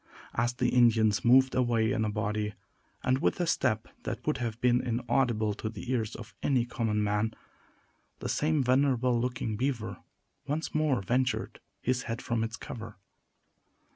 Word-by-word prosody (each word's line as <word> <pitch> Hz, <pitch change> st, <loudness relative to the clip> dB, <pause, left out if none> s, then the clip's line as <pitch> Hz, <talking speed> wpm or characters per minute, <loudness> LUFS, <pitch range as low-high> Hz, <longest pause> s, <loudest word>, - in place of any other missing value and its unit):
As 120 Hz, +1 st, +1 dB
the 125 Hz, 0 st, +1 dB
Indians 115 Hz, -4 st, +4 dB
moved 130 Hz, +2 st, +6 dB
away 120 Hz, -3 st, +2 dB
in 110 Hz, -, +1 dB
a -, -, 0 dB
body, 105 Hz, 0 st, -2 dB, 0.5 s
and 130 Hz, +1 st, +2 dB
with -, -, +1 dB
a 175 Hz, -, +2 dB
step 120 Hz, -8 st, +1 dB
that -, -, -5 dB
would 150 Hz, -, +1 dB
have 115 Hz, -2 st, -3 dB
been 125 Hz, 0 st, +3 dB
inaudible 120 Hz, -2 st, +1 dB
to 110 Hz, -, -4 dB
the 120 Hz, +2 st, -6 dB
ears 115 Hz, -3 st, -1 dB
of 115 Hz, 0 st, -10 dB
any 130 Hz, -4 st, +2 dB
common 110 Hz, -3 st, -1 dB
man, 105 Hz, +2 st, 0 dB, 0.8 s
the -, -, -5 dB
same 155 Hz, -2 st, +1 dB
venerable 125 Hz, -2 st, +2 dB
looking 125 Hz, -3 st, -2 dB
beaver 125 Hz, -2 st, -2 dB, 0.5 s
once 155 Hz, +3 st, -2 dB
more 150 Hz, -8 st, +1 dB
ventured 125 Hz, +5 st, 0 dB, 0.2 s
his 125 Hz, 0 st, +1 dB
head 115 Hz, +1 st, -2 dB
from 115 Hz, -2 st, -1 dB
its 115 Hz, +2 st, -4 dB
cover. 115 Hz, -3 st, -8 dB
120 Hz, 160 wpm, -29 LUFS, 110-130 Hz, 0.8 s, moved